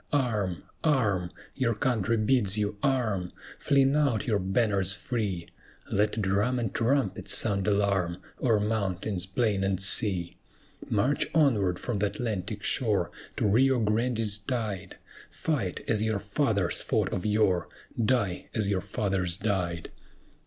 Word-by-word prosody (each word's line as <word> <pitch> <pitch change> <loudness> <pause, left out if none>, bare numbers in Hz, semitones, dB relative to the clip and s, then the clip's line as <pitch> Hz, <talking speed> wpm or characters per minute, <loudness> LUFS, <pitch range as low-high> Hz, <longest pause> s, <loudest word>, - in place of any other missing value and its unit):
Arm! 110 - 0 0.2
arm! 110 - +2 0.2
your 120 -4 0
country 115 -2 +1
bids 110 -3 +1
you 105 -1 -1
arm! 110 -10 0 0.3
Fling 140 -1 +3
out 140 -8 +2
your 110 -4 +1
banners 100 -1 +1
free 105 -8 -3 0.4
Let 105 +2 +1
drum 100 +6 +1
and 115 -4 -2
trumpet 115 -6 0
sound 100 -2 +1
alarm, 100 -4 +1 0.2
O'er 115 -5 +3
mountains, 100 -3 -1
plain, 100 -1 0
and 95 -1 0
sea. 95 -3 +1 0.5
March 130 +8 +1
onward 105 - +3
from 120 -5 -3
th' - - -1
Atlantic 105 -3 -3
shore, - - +1 0.3
To - - +1
Rio 125 +5 +4
Grande's 110 -1 +1
tide 105 -4 -4 0.3
Fight 120 - -2
as 110 -2 +1
your 110 -1 +1
fathers 100 - 0
fought - - 0
of 90 - -2
yore! 105 -5 +2 0.3
Die 105 -6 0
as 110 -3 +1
your 100 -2 0
fathers 95 -4 -1
died! 90 -6 -2
105 Hz, 130 wpm, -28 LUFS, 95-120 Hz, 0.5 s, Rio